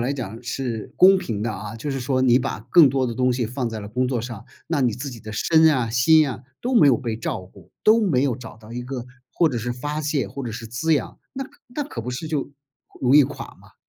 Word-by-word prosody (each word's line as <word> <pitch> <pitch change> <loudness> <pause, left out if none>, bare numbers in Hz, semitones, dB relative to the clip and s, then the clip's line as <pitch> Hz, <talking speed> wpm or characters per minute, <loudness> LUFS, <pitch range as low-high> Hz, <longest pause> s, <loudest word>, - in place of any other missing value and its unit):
来 125 +3 0
讲 115 -3 -6
是 120 -3 -4
公 190 +1 +7
平 110 - -4
的 110 -1 -1
啊， 105 +3 -7
就 130 +6 -4
是 135 - -3
说 130 +1 0
你 125 -1 +5
把 - - -3
更 165 -6 +8
多 130 -1 0
的 115 - -3
东 125 +1 +2
西 120 0 -1
放 125 +1 -3
在 110 - -5
了 100 - -7
工 125 +3 0
作 125 -3 -1
上， 115 -2 -7 0.2
那 165 -4 0
你 120 -4 +2
自 130 +4 -5
己 115 -3 -10
的 110 - -8
身 160 +8 +4
啊、 125 -5 0
心 150 +6 +5
啊， 125 - -6 0.2
都 250 +1 -1
没 150 -10 +7
有 125 - +5
被 115 -2 -3
照 115 - -3
顾， 90 -1 -17
都 220 +2 +6
没 170 - +2
有 135 -4 +1
找 115 -4 -10
到 110 +1 -13
一 125 +1 -4
个 125 -1 -6 0.3
或 165 - +3
者 120 - -2
是 120 +2 -3
发 145 +5 -4
泄 150 -2 -1
或 140 - -7
者 120 - -4
是 115 +1 -7
滋 120 +8 -1
养， 145 - -3
那 270 0 -4 0.2
那 280 +4 -4
可 130 - -6
不 125 - -4
是 125 +5 -5
就 150 -3 -2 0.5
容 130 +1 +3
易 150 - +9
垮 130 - -6
吗？ - - -20
125 Hz, 280 characters per minute, -23 LUFS, 115-145 Hz, 0.5 s, 易